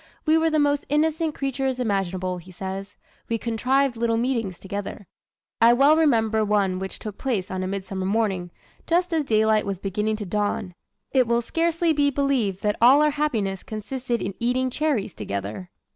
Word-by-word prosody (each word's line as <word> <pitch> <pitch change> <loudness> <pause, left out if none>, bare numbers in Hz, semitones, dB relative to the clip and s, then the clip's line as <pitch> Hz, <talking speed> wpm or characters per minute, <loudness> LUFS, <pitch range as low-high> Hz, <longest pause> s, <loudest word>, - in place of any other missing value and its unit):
"We 310 0 +4
were 325 0 +3
the 310 - +1
most 290 -1 +1
innocent 315 +1 +1
creatures 270 -1 -2
imaginable," 185 -5 -1
he 180 +2 -14
says. 195 +2 -6 0.3
"We 230 - +1
contrived 250 +4 +1
little 230 0 0
meetings 230 -7 -1
together. 200 +1 -6 0.6
I 230 +1 +7
well 280 +5 +5
remember 225 -8 +3
one 200 -3 +1
which 190 0 -5
took 210 -3 -8
place 220 -10 -2
on 185 0 -2
a 185 - -2
midsummer 190 -1 -3
morning, 195 -4 0 0.4
just 350 +1 +1
as 315 -3 +1
daylight 220 -2 +3
was 195 -1 -3
beginning 210 +3 -1
to 210 -1 -5
dawn. 205 -1 -2 0.4
It 255 -3 +3
will 235 0 +1
scarcely 335 +3 +1
be 290 -1 +3
believed 260 -9 0
that 210 0 +1
all 265 +5 +7
our 300 - +3
happiness 225 -11 -1
consisted 235 +3 -4
in 195 - -3
eating 255 +2 +1
cherries 260 - -1
together." 100 - -5
225 Hz, 175 wpm, -24 LUFS, 195-275 Hz, 0.6 s, I